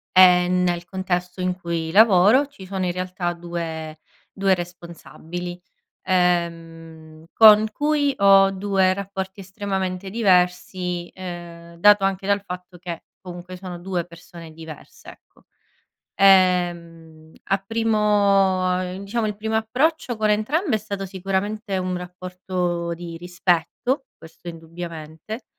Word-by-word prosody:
e 180 Hz, -1 st, +7 dB
nel 180 Hz, -1 st, +1 dB
contesto 185 Hz, -1 st, -3 dB
in 180 Hz, 0 st, -1 dB
cui 165 Hz, -2 st, -3 dB
lavoro 215 Hz, +6 st, +5 dB
ci 275 Hz, -9 st, -13 dB
sono 190 Hz, -1 st, -3 dB
in 175 Hz, -, 0 dB
realtà 180 Hz, -1 st, -3 dB
2, 165 Hz, -2 st, -6 dB, 0.3 s
2 195 Hz, -1 st, +2 dB
responsabili. 175 Hz, 0 st, -7 dB, 0.4 s
Ehm, 165 Hz, -3 st, -2 dB
con 215 Hz, -1 st, +7 dB
cui 290 Hz, +1 st, +1 dB
ho 195 Hz, -1 st, +6 dB
2 190 Hz, -1 st, +1 dB
rapporti 195 Hz, 0 st, -6 dB
estremamente 190 Hz, -1 st, -4 dB
diversi, 180 Hz, -3 st, +1 dB
ehm, 170 Hz, -2 st, -9 dB
dato 205 Hz, +2 st, +5 dB
anche 195 Hz, 0 st, -1 dB
dal 200 Hz, 0 st, +2 dB
fatto 180 Hz, -1 st, -9 dB
che 175 Hz, -1 st, -7 dB, 0.2 s
comunque 180 Hz, 0 st, -9 dB
sono 180 Hz, -1 st, -8 dB
2 180 Hz, -1 st, -3 dB
persone 170 Hz, -1 st, -13 dB
diverse 160 Hz, -1 st, -12 dB
ecco. -, -, -19 dB, 0.7 s
Ehm 175 Hz, -4 st, +2 dB, 0.3 s
a 195 Hz, -, +4 dB
primo 195 Hz, -4 st, +1 dB
diciamo 215 Hz, +3 st, -2 dB
il 210 Hz, -1 st, -2 dB
primo 220 Hz, +1 st, -3 dB
approccio 250 Hz, +3 st, 0 dB
con 215 Hz, 0 st, +1 dB
entrambe 260 Hz, -, +1 dB
è -, -, +2 dB
stato 200 Hz, -2 st, -5 dB
sicuramente 195 Hz, +2 st, -3 dB
un 185 Hz, -1 st, -2 dB
rapporto 180 Hz, -1 st, -4 dB
di 170 Hz, 0 st, -8 dB
rispetto, 180 Hz, -, -1 dB
questo 165 Hz, +2 st, -15 dB
indubbiamente, 165 Hz, +4 st, -8 dB
185 Hz, 120 wpm, -22 LUFS, 175-200 Hz, 0.7 s, e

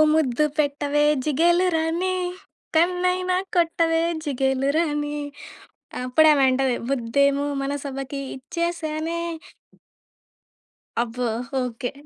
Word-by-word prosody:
ముద్దు 300 Hz, -1 st, +2 dB
పెట్టవే 290 Hz, 0 st, +1 dB, 0.2 s
జిగేలురాణి 345 Hz, +3 st, +2 dB, 0.6 s
కన్నైనా 365 Hz, +1 st, +2 dB, 0.2 s
కొట్టవే 330 Hz, -1 st, +2 dB, 0.2 s
జిగేలురాణి. 290 Hz, +2 st, 0 dB, 0.9 s
అప్పుడు 310 Hz, +5 st, +5 dB
ఆమె 275 Hz, -2 st, +3 dB
అంటది. 260 Hz, -1 st, +1 dB
ముద్దేమో 280 Hz, +3 st, +2 dB, 0.2 s
మనసబకి 275 Hz, 0 st, -4 dB
ఇచ్చేసానే. 325 Hz, +3 st, -3 dB, 1.8 s
అబ్బో! 240 Hz, +1 st, -1 dB, 0.3 s
ఓకే! 245 Hz, 0 st, -3 dB
295 Hz, 70 wpm, -23 LUFS, 270-330 Hz, 1.8 s, అప్పుడు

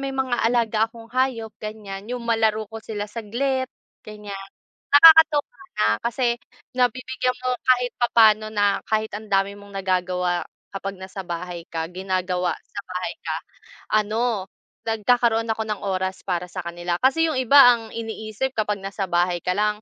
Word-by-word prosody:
may 275 Hz, 0 st, -3 dB
mga 265 Hz, -2 st, -1 dB
alaga 230 Hz, -2 st, +2 dB
akong 230 Hz, 0 st, -14 dB
hayop 250 Hz, -4 st, 0 dB
ganyan, 210 Hz, -2 st, -7 dB
yung 245 Hz, -1 st, -4 dB
malaro 220 Hz, -1 st, +1 dB
ko 225 Hz, +1 st, -8 dB
sila 210 Hz, -2 st, -5 dB
saglit, 250 Hz, +5 st, -2 dB, 0.4 s
ganyan. 205 Hz, -2 st, -8 dB, 0.4 s
Nakakatuwa 320 Hz, +5 st, +7 dB, 0.2 s
na, 105 Hz, -, +4 dB, 0.2 s
kasi 235 Hz, 0 st, 0 dB, 0.4 s
nabibigyan 255 Hz, +1 st, 0 dB
mo 255 Hz, -, +1 dB
kahit 250 Hz, -1 st, +3 dB
papaano 220 Hz, -3 st, +5 dB
na 205 Hz, -1 st, +2 dB
kahit 220 Hz, 0 st, 0 dB
ang 215 Hz, 0 st, -10 dB
dami 195 Hz, 0 st, +2 dB
mong 200 Hz, -1 st, -12 dB
nagagawa 180 Hz, -2 st, 0 dB, 0.3 s
kapag 195 Hz, 0 st, -5 dB
nasa 190 Hz, +1 st, -7 dB
bahay 175 Hz, 0 st, -5 dB
ka, 165 Hz, -1 st, -3 dB
ginagawa 185 Hz, -1 st, -1 dB
sa -, -, -7 dB
bahay 185 Hz, +4 st, -3 dB
ka, -, -, -2 dB, 0.7 s
ano, 220 Hz, -2 st, -1 dB, 0.4 s
nagkakaroon 225 Hz, 0 st, +2 dB
ako 220 Hz, 0 st, 0 dB
ng 210 Hz, -2 st, -4 dB
oras 190 Hz, 0 st, -2 dB
para 180 Hz, -2 st, -1 dB
sa 185 Hz, +1 st, -5 dB
kanila. 175 Hz, 0 st, -3 dB
Kasi 320 Hz, +5 st, +3 dB
yung 260 Hz, -, -2 dB
iba 270 Hz, +3 st, +5 dB, 0.2 s
ang 225 Hz, -1 st, -10 dB
iniisip 225 Hz, +2 st, -4 dB
kapag 210 Hz, -1 st, 0 dB
nasa 195 Hz, 0 st, -3 dB
bahay 175 Hz, 0 st, +1 dB
ka 180 Hz, -, 0 dB
lang, 210 Hz, 0 st, 0 dB
215 Hz, 155 wpm, -23 LUFS, 195-240 Hz, 0.7 s, Nakakatuwa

